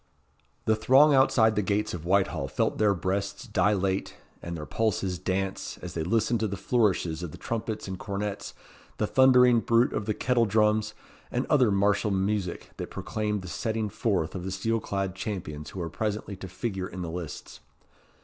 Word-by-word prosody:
The 110 Hz, -, +3 dB
throng 135 Hz, +7 st, +5 dB
outside 115 Hz, -5 st, +4 dB
the 105 Hz, -, +2 dB
gates 105 Hz, +2 st, 0 dB
of 85 Hz, -2 st, -6 dB
Whitehall 95 Hz, -7 st, +1 dB
felt 65 Hz, -, -1 dB
their 105 Hz, -2 st, +4 dB
breasts 95 Hz, +3 st, -2 dB
dilate, 95 Hz, -2 st, 0 dB, 0.3 s
and 85 Hz, 0 st, -5 dB
their 75 Hz, -, -6 dB
pulses 95 Hz, -4 st, -1 dB
dance, 95 Hz, 0 st, -2 dB
as 90 Hz, -2 st, -6 dB
they 80 Hz, -, -2 dB
listened 115 Hz, +6 st, +1 dB
to 110 Hz, -, 0 dB
the 100 Hz, 0 st, -4 dB
flourishes 95 Hz, -6 st, +1 dB
of 90 Hz, -, -4 dB
the -, -, -10 dB
trumpets 110 Hz, -2 st, -4 dB
and 95 Hz, -1 st, -5 dB
cornets, 100 Hz, 0 st, -4 dB, 0.4 s
the -, -, +1 dB
thundering 125 Hz, -2 st, +6 dB
bruit 115 Hz, +2 st, +3 dB
of 105 Hz, -, -3 dB
the 105 Hz, -, 0 dB
kettle 120 Hz, -2 st, +2 dB
drums, 110 Hz, +1 st, +2 dB, 0.3 s
and 125 Hz, +2 st, -1 dB
other 130 Hz, -7 st, +5 dB
martial 100 Hz, +1 st, +2 dB
music 95 Hz, -1 st, -1 dB
that -, -, -5 dB
proclaimed 105 Hz, -2 st, -3 dB
the -, -, -7 dB
setting 110 Hz, +3 st, -2 dB
forth 95 Hz, -8 st, -1 dB
of 90 Hz, -, -5 dB
the 95 Hz, -, -3 dB
steel 115 Hz, +5 st, -1 dB
clad 100 Hz, -3 st, -2 dB
champions 95 Hz, -7 st, -5 dB
who 95 Hz, -, -8 dB
were 85 Hz, -2 st, -3 dB
presently 105 Hz, 0 st, -3 dB
to 95 Hz, -, -7 dB
figure 95 Hz, 0 st, -4 dB
in 90 Hz, 0 st, -6 dB
the 85 Hz, -, -4 dB
lists. 85 Hz, -4 st, -7 dB
100 Hz, 180 wpm, -27 LUFS, 95-110 Hz, 0.4 s, thundering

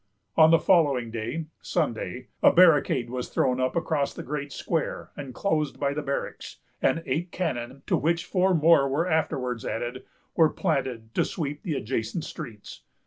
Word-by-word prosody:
On 160 Hz, -1 st, +7 dB
the 165 Hz, -, +7 dB
following 145 Hz, -10 st, +3 dB
day, 115 Hz, +8 st, -3 dB, 0.2 s
Sunday, 120 Hz, +2 st, -2 dB
a -, -, +7 dB
barricade 155 Hz, -7 st, +4 dB
was 125 Hz, -1 st, -4 dB
thrown 130 Hz, -1 st, +1 dB
up 130 Hz, +4 st, 0 dB
across 155 Hz, -4 st, 0 dB
the -, -, -6 dB
great 145 Hz, -1 st, -4 dB
square 165 Hz, +2 st, -3 dB
enclosed 145 Hz, +2 st, -2 dB
by 140 Hz, -1 st, 0 dB
the 150 Hz, -, -2 dB
barracks; 140 Hz, -1 st, -4 dB, 0.2 s
and 165 Hz, -, +2 dB
eight 165 Hz, +7 st, -2 dB
cannon, 135 Hz, -6 st, -3 dB
to -, -, +2 dB
which 165 Hz, +2 st, 0 dB
four 185 Hz, -1 st, +2 dB
more 155 Hz, -3 st, +5 dB
were 155 Hz, +6 st, 0 dB
afterwards 130 Hz, -7 st, -1 dB
added, 120 Hz, +3 st, -4 dB, 0.3 s
were 160 Hz, -2 st, +5 dB
planted 130 Hz, -11 st, -2 dB
to -, -, +2 dB
sweep 145 Hz, -3 st, -4 dB
the 155 Hz, -, -3 dB
adjacent 115 Hz, +5 st, -2 dB
streets. 120 Hz, -11 st, -9 dB
145 Hz, 160 wpm, -26 LUFS, 125-165 Hz, 0.3 s, On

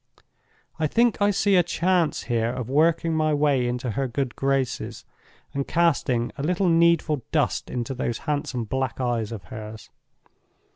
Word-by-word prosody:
I 155 Hz, -, +2 dB
think 235 Hz, +6 st, +2 dB
I 205 Hz, -, +4 dB
see 200 Hz, 0 st, +2 dB
a 180 Hz, -, +6 dB
chance 175 Hz, -1 st, 0 dB
here 115 Hz, -1 st, 0 dB
of 125 Hz, 0 st, -4 dB
working 165 Hz, +3 st, +2 dB
my 155 Hz, -1 st, +2 dB
way 145 Hz, -4 st, +2 dB
into 125 Hz, 0 st, -2 dB
her 135 Hz, +5 st, -1 dB
good 130 Hz, 0 st, -3 dB
graces, 130 Hz, -5 st, -2 dB, 0.5 s
and 140 Hz, 0 st, -2 dB
casting 140 Hz, -8 st, +1 dB
a -, -, -2 dB
little 180 Hz, +4 st, +1 dB
needful 165 Hz, -3 st, +3 dB
dust -, -, 0 dB
into 125 Hz, +1 st, -3 dB
those 120 Hz, -2 st, -2 dB
handsome 145 Hz, -5 st, -2 dB
black 130 Hz, +3 st, -3 dB
eyes 120 Hz, -4 st, -1 dB
of 110 Hz, -5 st, -6 dB
hers. 110 Hz, +1 st, -9 dB
140 Hz, 155 wpm, -24 LUFS, 120-165 Hz, 0.5 s, a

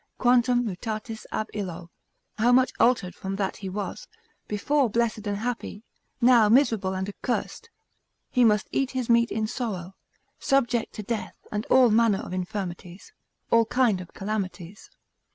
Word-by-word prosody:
Quantum 245 Hz, 0 st, +3 dB
mutatus 220 Hz, +2 st, -5 dB
ab 215 Hz, -, -2 dB
illo? 175 Hz, -4 st, -6 dB, 0.5 s
How 235 Hz, +3 st, +4 dB
much 255 Hz, 0 st, +4 dB
altered 230 Hz, -7 st, +3 dB
from 195 Hz, 0 st, -5 dB
that 195 Hz, -1 st, -2 dB
he 195 Hz, -, -6 dB
was; 195 Hz, -1 st, -5 dB, 0.4 s
before 265 Hz, +5 st, +1 dB
blessed 225 Hz, -1 st, -1 dB
and 205 Hz, 0 st, -1 dB
happy, 225 Hz, -2 st, -4 dB, 0.4 s
now 240 Hz, -3 st, +5 dB
miserable 225 Hz, -6 st, +3 dB
and 190 Hz, +1 st, -3 dB
accursed; 250 Hz, -, -4 dB, 0.6 s
He 250 Hz, -, +3 dB
must 210 Hz, -2 st, +3 dB
eat 270 Hz, -2 st, 0 dB
his 245 Hz, -2 st, 0 dB
meat 235 Hz, 0 st, +4 dB
in 220 Hz, +1 st, -1 dB
sorrow, 210 Hz, -6 st, -4 dB, 0.5 s
subject 245 Hz, -4 st, +1 dB
to 210 Hz, -, -5 dB
death 220 Hz, +1 st, -4 dB, 0.2 s
and 210 Hz, +1 st, -3 dB
all 255 Hz, -3 st, +5 dB
manner 225 Hz, -2 st, +4 dB
of -, -, -7 dB
infirmities, 180 Hz, -1 st, -6 dB, 0.4 s
all 230 Hz, 0 st, +5 dB
kind 225 Hz, -5 st, +2 dB
of 180 Hz, -, -11 dB
calamities. 195 Hz, -2 st, -5 dB
215 Hz, 150 wpm, -26 LUFS, 195-240 Hz, 0.6 s, now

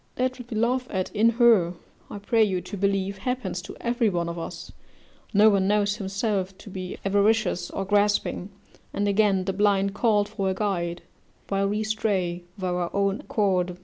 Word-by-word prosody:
That 255 Hz, +1 st, -1 dB
what 245 Hz, -1 st, -10 dB
we 220 Hz, -, -3 dB
laugh 250 Hz, +3 st, +1 dB
at 185 Hz, -2 st, -2 dB
in 225 Hz, +2 st, +4 dB
her, 215 Hz, -8 st, +5 dB, 0.3 s
I -, -, -6 dB
pray 220 Hz, +3 st, +2 dB
you 190 Hz, -4 st, 0 dB
to 180 Hz, +4 st, -8 dB
believe, 195 Hz, 0 st, -1 dB
happens 210 Hz, -5 st, -3 dB
to 195 Hz, -, -10 dB
every 235 Hz, -1 st, +1 dB
one 170 Hz, -3 st, -1 dB
of 170 Hz, 0 st, -5 dB
us: 165 Hz, -, -7 dB, 0.6 s
no 210 Hz, +1 st, +6 dB
one 195 Hz, -1 st, +2 dB
knows 205 Hz, 0 st, +2 dB
himself 195 Hz, -1 st, -2 dB
to 205 Hz, -, -12 dB
be 185 Hz, -1 st, -6 dB
avaricious 200 Hz, -2 st, +2 dB
or 195 Hz, -, -4 dB
grasping; 205 Hz, -1 st, +1 dB, 0.4 s
and, 205 Hz, 0 st, 0 dB
again, 200 Hz, -2 st, +2 dB
the 195 Hz, -, -1 dB
blind 200 Hz, 0 st, +2 dB
call 210 Hz, -1 st, +2 dB
for 195 Hz, -1 st, -2 dB
a 190 Hz, -, -1 dB
guide, 175 Hz, -4 st, -2 dB, 0.5 s
while 195 Hz, 0 st, +1 dB
we 210 Hz, +1 st, -1 dB
stray 190 Hz, -5 st, -1 dB
of 190 Hz, -, -9 dB
our 180 Hz, -1 st, -1 dB
own 200 Hz, +1 st, +1 dB
accord. 185 Hz, -4 st, 0 dB
200 Hz, 180 wpm, -25 LUFS, 190-215 Hz, 0.6 s, no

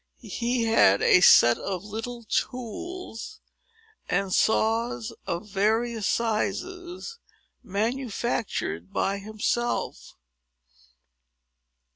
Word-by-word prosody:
He 240 Hz, 0 st, -2 dB
had 225 Hz, -, +4 dB
a 180 Hz, -, +6 dB
set 120 Hz, -8 st, +7 dB
of 190 Hz, -2 st, -4 dB
little 225 Hz, +3 st, -6 dB
tools, 255 Hz, -, -4 dB, 0.7 s
and 195 Hz, 0 st, 0 dB
saws 225 Hz, +1 st, +1 dB
of 170 Hz, +5 st, -3 dB
various 220 Hz, +2 st, 0 dB
sizes, 355 Hz, -, -2 dB, 0.4 s
manufactured 215 Hz, -, -2 dB
by 195 Hz, +1 st, 0 dB
himself. 215 Hz, +3 st, -2 dB
225 Hz, 75 wpm, -26 LUFS, 200-240 Hz, 0.7 s, set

